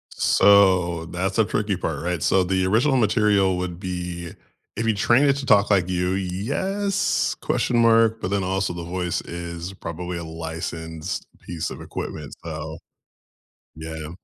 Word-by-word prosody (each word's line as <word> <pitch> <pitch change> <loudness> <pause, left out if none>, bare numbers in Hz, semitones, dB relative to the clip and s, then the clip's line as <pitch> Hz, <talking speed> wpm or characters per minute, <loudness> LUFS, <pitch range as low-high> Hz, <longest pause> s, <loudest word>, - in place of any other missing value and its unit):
So 90 -5 +4
that's 95 +4 -2
a 110 - +5
tricky 105 -3 -1
part, 80 -5 -3
right? 90 -3 -2
So 95 -1 +3
the 95 0 +1
original 125 +8 +3
material 105 -5 +3
would 90 -1 -4
be 90 -2 -5 0.4
If 110 - -2
you 110 - +3
train 120 +6 +3
it 140 -1 +4
to 135 - -4
talk 100 -3 +4
like 95 -3 +3
you, 90 0 0
yes, 140 - -1
question 120 - 0
mark? 115 -1 +4
But 90 - -2
then 100 -1 +1
also 95 0 -1
the 85 -1 -6
voice 90 0 -2
is 85 +1 -6
probably 90 0 -5
a 85 - -5
licensed 80 0 -5
piece 85 -2 -5
of - - -8
equipment. 75 -3 -6
So 80 0 -6 1.0
Yeah. 80 -1 -7
90 Hz, 155 wpm, -23 LUFS, 85-100 Hz, 1.0 s, a